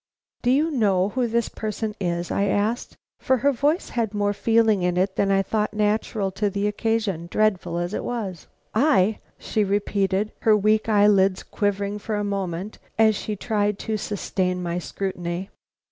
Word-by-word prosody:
"Do 245 - +1
you 300 +6 +3
know 200 -8 +2
who 250 +2 0
this 235 0 0
person 215 0 -4
is?" 175 -2 -2
I 200 - +1
asked, 205 +4 -1 0.2
for 260 - +2
her 285 +3 +3
voice 290 +6 0
had 225 -3 -2
more 205 0 +1
feeling 225 -2 +3
in 180 0 0
it 190 +1 +1
than 200 - +1
I 195 0 +3
thought 215 +1 -1
natural 210 -1 0
to 205 +2 0
the 200 +1 -2
occasion, 210 -5 -1
dreadful 195 -4 +1
as 175 +3 -2
it - - -2
was. 200 -9 -4 0.3
"I?" 220 -5 +3 0.2
she 215 - -1
repeated, 200 0 0
her 215 -1 +4
weak 215 +2 +2
eyelids 200 -3 +4
quivering 205 0 -2
for 215 +1 -3
a 205 - -1
moment 195 -1 -3 0.2
as 220 -1 +5
she 210 +1 -3
tried 210 -1 0
to 220 - -1
sustain 185 -3 -2
my 175 0 -2
scrutiny. 180 0 -4
205 Hz, 170 wpm, -24 LUFS, 190-220 Hz, 0.3 s, as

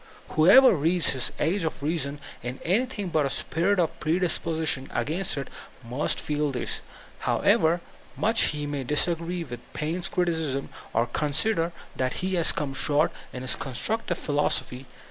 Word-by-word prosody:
Whoever 200 +13 +7
reads 165 +2 +2
his 130 -2 +2
""Age 185 +2 +1
of 160 -3 -3
Reason*' 145 -2 -2 0.2
in 125 +2 -5
anything 205 +1 0
but 155 -4 +2
a - - -3
spirit 170 +8 0
of 170 -3 0
predispo 165 0 0
sition 140 -4 0
against 170 +2 0
it, 135 - -3 0.4
must 130 +6 0
feel 150 0 -1
this, 125 -3 -3 0.4
however 165 +2 +2 0.4
much 225 +2 +4
he 150 -1 -1
may 145 -2 -3
disagree 170 +5 0
with 120 -6 -7
Paine's 165 +4 -2
criticism, 160 -6 -1 0.2
or 115 +1 +2
consider 165 - +1 0.3
that 130 -1 0
he 190 - -1
has 170 -3 +3
come 145 -2 -3
short 145 +2 +2 0.2
in 125 - -6
his 130 - 0
constructive 175 - -2
philosophy. 140 -3 -1
155 Hz, 150 wpm, -26 LUFS, 140-175 Hz, 0.4 s, Whoever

